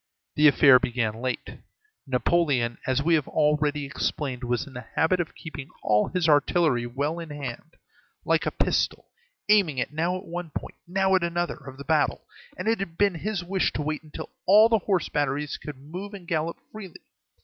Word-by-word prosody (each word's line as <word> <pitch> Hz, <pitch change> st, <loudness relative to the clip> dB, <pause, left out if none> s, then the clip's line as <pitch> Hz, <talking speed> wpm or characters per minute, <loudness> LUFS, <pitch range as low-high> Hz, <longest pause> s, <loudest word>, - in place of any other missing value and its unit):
The 150 Hz, 0 st, +5 dB
affair 140 Hz, -3 st, +7 dB
began 115 Hz, -3 st, -2 dB
late. 130 Hz, -1 st, -4 dB, 0.5 s
Napoleon, 130 Hz, -2 st, +1 dB
as 130 Hz, +2 st, +1 dB
we 170 Hz, +2 st, +3 dB
have 155 Hz, -4 st, +2 dB
already 150 Hz, -1 st, +1 dB
explained, 135 Hz, -1 st, -3 dB
was 120 Hz, -1 st, -1 dB
in 140 Hz, -, -13 dB
the 125 Hz, -3 st, -8 dB
habit 180 Hz, +3 st, +2 dB
of 170 Hz, -, -3 dB
keeping 145 Hz, -4 st, -8 dB
all 105 Hz, 0 st, +3 dB
his 180 Hz, -3 st, 0 dB
artillery 145 Hz, -4 st, +3 dB
well 145 Hz, +7 st, -2 dB
in 165 Hz, -2 st, -7 dB
hand, 145 Hz, +1 st, -7 dB, 0.5 s
like -, -, +2 dB
a -, -, 0 dB
pistol, -, -, -1 dB, 0.4 s
aiming 200 Hz, -9 st, +4 dB
it 125 Hz, -, -2 dB
now 170 Hz, +4 st, 0 dB
at 185 Hz, -, -10 dB
one 175 Hz, 0 st, -5 dB
point, -, -, -8 dB
now 190 Hz, +2 st, +1 dB
at 190 Hz, -, +4 dB
another, 175 Hz, 0 st, -1 dB
of 135 Hz, -2 st, -11 dB
the 140 Hz, -, -9 dB
battle; 150 Hz, 0 st, +1 dB, 0.4 s
and -, -, -4 dB
it 225 Hz, -1 st, +2 dB
had 170 Hz, -4 st, -5 dB
been 205 Hz, -2 st, +3 dB
his 190 Hz, +2 st, -3 dB
wish 190 Hz, +1 st, 0 dB
to 150 Hz, -, -2 dB
wait 155 Hz, 0 st, -2 dB
until 155 Hz, -2 st, -9 dB, 0.4 s
the 225 Hz, -, +4 dB
horse 190 Hz, -5 st, +1 dB
batteries 145 Hz, 0 st, -1 dB
could 150 Hz, -3 st, -8 dB
move 180 Hz, +9 st, -8 dB
and 180 Hz, -4 st, -11 dB
gallop 165 Hz, +1 st, -1 dB
freely. 200 Hz, -5 st, -10 dB
150 Hz, 185 wpm, -26 LUFS, 135-175 Hz, 0.5 s, affair